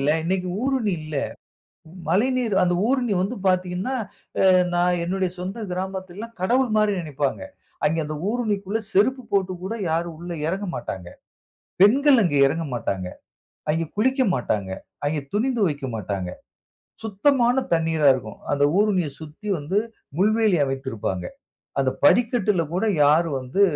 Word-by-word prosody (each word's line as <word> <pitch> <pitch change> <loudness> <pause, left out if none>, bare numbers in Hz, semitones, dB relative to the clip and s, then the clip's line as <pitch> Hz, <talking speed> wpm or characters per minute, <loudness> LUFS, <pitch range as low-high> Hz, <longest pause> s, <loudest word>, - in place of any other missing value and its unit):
இல்ல. 140 +2 +2
இன்னக்கி 185 +1 -1
ஊருணி 260 -6 +1
இல்ல. 155 0 -7 0.9
மழைநீர் 235 +5 +1
அந்த 175 -1 +2
ஊருணி 250 -4 +1
வந்து 210 +7 -1
பார்த்தீங்கன்னா, 185 +5 0 0.6
அ - - +7 0.2
நான் 175 0 +2
என்னுடைய 185 +1 -1
சொந்த 190 +5 -5
கிராமத்தில 185 0 -4
எல்லாம் 230 +2 -8
கடவுள்மாரி 215 0 +2
நினைப்பாங்க. 145 -4 -2 0.4
அங்கே 160 +2 +2
அந்த 155 +1 -4
ஊருணிக்குள்ல 215 -2 -1
செருப்பு 255 +6 +3
போட்டு 190 -2 +1
கூட 205 +5 -3 0.2
யாரும் 165 +1 -1
உள்ள 175 +1 -6
இறங்க 195 +4 -2
மாட்டாங்க. 95 -7 -5 0.7
பெண்கள் 265 +6 +6
அங்க 155 -6 +1
இறங்க 160 +4 -1
மாட்டாங்க. 95 -5 -2 0.6
அங்கு 165 +2 0
குளிக்க 260 +5 +2
மாட்டாங்க. 105 -6 -1 0.3
அங்கே 150 +1 0
துணி 230 +6 +2
துவைக்க 145 -9 0
மாட்டாங்க. 100 -3 -3 0.7
சுத்தமான 240 +4 +2 0.2
தண்ணீரா 160 -3 +2
இருக்கும். 110 -5 -6
அந்த 145 0 +2
ஊருணிய 200 -6 +2
சுத்தி 160 +7 -10
வந்து 150 +7 -2 0.4
முள்வேலி 215 -1 +3
அமைத்திருப்பாங்க. 130 -9 -3 0.5
அந்த 135 -1 +2
படிக்கட்டில 210 - +3
கூட 190 - +1 0.2
யாரும் 150 0 +3
வந்து 130 +11 0
185 Hz, 130 wpm, -23 LUFS, 150-215 Hz, 0.9 s, அ